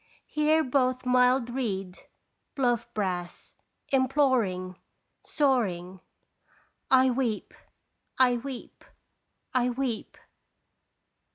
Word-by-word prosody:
Hear 305 Hz, +1 st, +2 dB
both 255 Hz, -1 st, 0 dB
mild 250 Hz, 0 st, +3 dB
reed, 195 Hz, -8 st, -3 dB, 0.6 s
bluff 245 Hz, -4 st, 0 dB
brass, 180 Hz, -4 st, -4 dB, 0.4 s
imploring, 255 Hz, -10 st, +1 dB, 0.4 s
soaring, 190 Hz, -, 0 dB, 0.9 s
"I 260 Hz, 0 st, +5 dB
weep! 240 Hz, -4 st, -2 dB, 0.6 s
I 250 Hz, -2 st, +4 dB
weep! 255 Hz, 0 st, -8 dB, 0.7 s
I 250 Hz, -1 st, +2 dB
weep!" 245 Hz, -2 st, -3 dB
250 Hz, 75 wpm, -27 LUFS, 205-265 Hz, 0.9 s, I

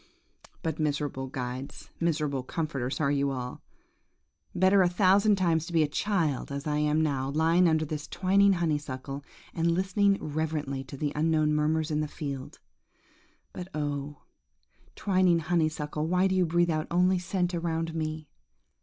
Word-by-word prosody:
But, 160 Hz, -2 st, -2 dB
miserable 145 Hz, -3 st, -1 dB
guides, 130 Hz, 0 st, -6 dB
miserable 150 Hz, -5 st, 0 dB
comforters 135 Hz, -2 st, -3 dB
are 140 Hz, -3 st, +2 dB
ye 140 Hz, -1 st, +1 dB
all! 130 Hz, -3 st, -3 dB, 0.9 s
Better 190 Hz, +2 st, +5 dB
a 180 Hz, -, +4 dB
thousand 200 Hz, +3 st, +4 dB
times 170 Hz, -4 st, +1 dB
to 175 Hz, -, -7 dB
be 160 Hz, -2 st, +4 dB
a -, -, +1 dB
child 160 Hz, -5 st, -1 dB
as 140 Hz, 0 st, -4 dB
I 150 Hz, -1 st, 0 dB
am 150 Hz, +1 st, +2 dB
now, 135 Hz, -3 st, -1 dB
lying 165 Hz, +4 st, +3 dB
under 160 Hz, -1 st, +1 dB
this 150 Hz, 0 st, -5 dB
twining 195 Hz, +1 st, +3 dB
honeysuckle, 145 Hz, -5 st, -3 dB, 0.3 s
and 165 Hz, 0 st, +1 dB
listening 195 Hz, +3 st, +2 dB
reverently 150 Hz, -3 st, -3 dB
to 140 Hz, +1 st, -9 dB
the 145 Hz, +1 st, -2 dB
unknown 155 Hz, 0 st, +2 dB
murmurs 155 Hz, +1 st, +1 dB
in 150 Hz, -, 0 dB
the 155 Hz, -, -1 dB
field! 140 Hz, -3 st, -6 dB, 1.0 s
But 180 Hz, -, -6 dB
oh! 145 Hz, -1 st, -4 dB, 0.7 s
twining 185 Hz, -3 st, +3 dB
honeysuckle, 155 Hz, -2 st, -1 dB
why 180 Hz, +2 st, +2 dB
do 190 Hz, -, +2 dB
you 185 Hz, -2 st, +2 dB
breathe 170 Hz, +1 st, +2 dB
out 155 Hz, 0 st, -1 dB
only 180 Hz, +2 st, +3 dB
scent 180 Hz, 0 st, -1 dB
around 165 Hz, -1 st, -2 dB
me? 155 Hz, -1 st, -4 dB
155 Hz, 155 wpm, -28 LUFS, 145-175 Hz, 1.0 s, Better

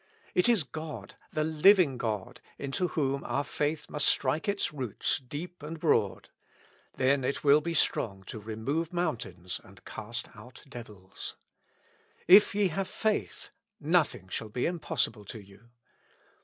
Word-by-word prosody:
It 180 Hz, +6 st, +4 dB
is 225 Hz, -9 st, +4 dB
God, 155 Hz, +2 st, -7 dB, 0.2 s
the 155 Hz, -, 0 dB
living 160 Hz, -3 st, +5 dB
God, 110 Hz, -4 st, -3 dB, 0.2 s
into 140 Hz, +6 st, -1 dB
whom 140 Hz, -4 st, -1 dB
our 140 Hz, -, -1 dB
faith 150 Hz, +2 st, -2 dB
must 150 Hz, -1 st, +1 dB
strike 145 Hz, +9 st, +2 dB
its 200 Hz, -5 st, 0 dB
roots 130 Hz, -7 st, -1 dB
deep 150 Hz, +7 st, -7 dB
and 155 Hz, +2 st, -6 dB
broad; 115 Hz, -, +1 dB, 0.7 s
then 135 Hz, +1 st, +3 dB
it 140 Hz, -, -1 dB
will 145 Hz, +1 st, +6 dB
be 170 Hz, +2 st, -2 dB
strong 100 Hz, -9 st, +1 dB
to 110 Hz, -, -7 dB
remove 115 Hz, +10 st, -2 dB
mountains 115 Hz, -, -3 dB
and 100 Hz, +1 st, -17 dB
cast 115 Hz, +2 st, -6 dB
out 125 Hz, 0 st, -13 dB
devils. 105 Hz, -8 st, -8 dB, 0.4 s
" -, -, -34 dB, 0.3 s
If 200 Hz, +3 st, +8 dB
ye 205 Hz, -2 st, +3 dB
have 190 Hz, +4 st, -2 dB
faith, 215 Hz, +2 st, -1 dB, 0.3 s
nothing 155 Hz, -, +2 dB
shall 110 Hz, +3 st, -4 dB
be 125 Hz, +4 st, -1 dB
impossible 160 Hz, -10 st, -1 dB
to 110 Hz, -, -7 dB
you." 100 Hz, +3 st, -17 dB
140 Hz, 145 wpm, -30 LUFS, 115-165 Hz, 0.7 s, If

